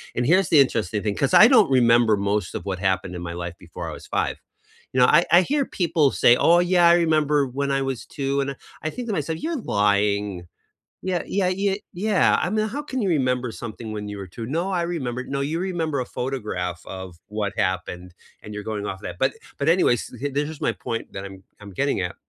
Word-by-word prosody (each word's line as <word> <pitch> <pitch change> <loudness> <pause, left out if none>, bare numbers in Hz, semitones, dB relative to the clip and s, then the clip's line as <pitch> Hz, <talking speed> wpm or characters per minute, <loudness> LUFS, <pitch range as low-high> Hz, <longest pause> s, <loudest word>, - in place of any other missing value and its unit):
And 120 - 0
here's 185 +2 +4
the 155 - +6
interesting 110 -6 +1
thing 105 -2 -1
'cause 140 - 0
I 215 - +9
don't 225 - +5
remember 120 -4 +4
most 100 -2 -1
of - - -5
what 95 -2 -3
happened 95 -1 -1
in 85 - -6
my 85 -1 -5
life 85 0 -5
before - - -8
I - - -6
was - - -10
5. - - -1 0.6
You 130 - +1
know, 125 - +7
I 170 +3 +5
I 175 +2 +8
hear 285 +3 0
people 165 -6 +1
say, 120 - +5
"Oh 170 +1 +5
yeah, 175 -1 +4
I 170 - +7
remember 155 -4 +2
when 140 +2 -3
I 135 0 +1
was 135 -3 -3
2," 140 0 -2
and 140 0 -2
I - - -8 0.3
I 155 - -1
think 245 -1 -6
to - - 0
myself, 160 0 -2
"You're 325 -1 -2
lying." 100 - 0 0.6
Yeah, 185 -2 -1
yeah, 190 -2 0
y 195 +2 0
yeah, 200 +2 +2
I - - 0
mean, 215 +1 0
"How 285 +6 -4
can 260 -5 -3
you 195 - 0
remember 125 -6 0
something 115 -1 -7
when 105 -1 -5
you 105 -1 -6
were 95 - -7
2?" 115 +5 -7
"No, 170 +8 -2
I 175 -2 0
remember" 130 -8 -3
"No, 140 0 -3
you 155 +4 -1
remember 165 -6 -2
a 125 - -2
photograph 105 -10 -4
of 95 -3 -8
what 105 -1 -3
happened, 90 -1 -2 0.3
and 105 0 -9
you're 105 - -5
going 105 -2 -4
off 95 -1 -5
that." - - -6
But 135 +1 +1 0.2
but 140 - 0
anyways, 165 -9 +4
s 125 - -12
h 145 -1 -2
there's 145 +1 0
just 160 - -10
my - - +2
point 115 0 -5
that 95 0 -5
I'm 95 -1 -10 0.2
I'm 100 -2 -11
getting 140 -7 +1
at, 90 -1 -3
135 Hz, 235 wpm, -23 LUFS, 105-170 Hz, 0.6 s, I